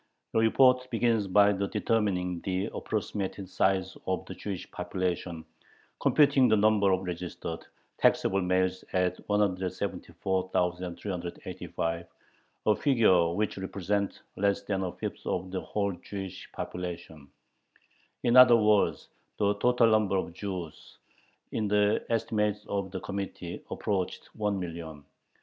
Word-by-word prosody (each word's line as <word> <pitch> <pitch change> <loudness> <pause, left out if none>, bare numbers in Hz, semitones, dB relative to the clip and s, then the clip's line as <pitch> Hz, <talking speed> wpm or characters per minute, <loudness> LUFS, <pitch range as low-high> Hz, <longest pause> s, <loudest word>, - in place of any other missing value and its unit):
The - - +3
report 125 +3 +4
begins 115 -3 +1
by 100 +2 +5
determining 100 -3 0
the 95 +2 -1
approximate 100 -2 -3
size 95 0 +1
of 95 0 -1
the - - -7
Jewish 100 -4 -6
population, 90 -2 -3 0.6
computing 140 -3 +5
the 110 -2 +4
number 105 -2 +4
of 95 0 +1
registered, 85 -2 -5 0.4
taxable 95 0 +3
males 95 0 +1
at 90 -1 +1
174,385 90 -3 -2 0.6
"a 105 - +4
figure 100 - +4
which 105 0 -1
represents 100 +1 -2
less 100 0 +1
than 95 -2 -1
a 90 -2 -2
fifth - - -6
of 90 0 -2
the 95 - -2
whole 100 -1 -1
Jewish 95 +1 -8
population." 85 -5 -6 1.0
In 120 0 +3
other 125 -2 +9
words, 105 -2 +2 0.3
the 100 0 +2
total 120 -1 +4
number 105 -3 +3
of 85 - -3
Jews, 90 -4 -7 0.5
in 110 -2 -1
the 105 0 +2
estimate 110 -2 +1
of 100 -1 -2
the 95 -1 -5
Committee, 95 -3 -5
approached 95 -3 -3
one 105 -2 -1
million. 80 -4 -6
95 Hz, 120 wpm, -29 LUFS, 90-105 Hz, 1.0 s, other